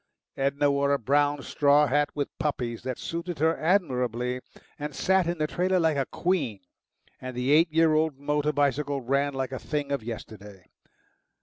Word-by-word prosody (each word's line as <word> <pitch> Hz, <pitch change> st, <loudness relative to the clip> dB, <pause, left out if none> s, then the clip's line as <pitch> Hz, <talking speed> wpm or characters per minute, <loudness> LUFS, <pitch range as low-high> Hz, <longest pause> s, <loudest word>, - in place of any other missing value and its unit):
Edna 140 Hz, +1 st, +1 dB
wore 140 Hz, 0 st, +2 dB
a -, -, +3 dB
brown 145 Hz, +3 st, +1 dB
straw 145 Hz, 0 st, +3 dB
hat 145 Hz, +1 st, +1 dB
with 145 Hz, -1 st, -3 dB
poppies, 125 Hz, -6 st, -2 dB
that 130 Hz, -2 st, -4 dB
suited 170 Hz, 0 st, -5 dB
her 160 Hz, +2 st, +2 dB
admirably, 125 Hz, -, 0 dB, 0.4 s
and 150 Hz, -1 st, -5 dB
sat 190 Hz, -2 st, +2 dB
in 175 Hz, 0 st, -1 dB
the 155 Hz, -, 0 dB
trailer 185 Hz, +4 st, +1 dB
like 160 Hz, -3 st, +2 dB
a 135 Hz, -, 0 dB
queen, 145 Hz, -, -1 dB, 0.6 s
and 130 Hz, -1 st, -7 dB
the 125 Hz, +2 st, 0 dB
eight 160 Hz, +2 st, +5 dB
year 160 Hz, 0 st, +4 dB
old 155 Hz, -2 st, +1 dB
motor 150 Hz, +1 st, 0 dB
bicycle 145 Hz, -1 st, 0 dB
ran 140 Hz, +3 st, 0 dB
like 135 Hz, -1 st, -2 dB
a 130 Hz, -, -4 dB
thing 145 Hz, -2 st, -3 dB
of 140 Hz, -, -1 dB
yesterday. 105 Hz, -4 st, -9 dB
145 Hz, 175 wpm, -27 LUFS, 130-155 Hz, 0.6 s, eight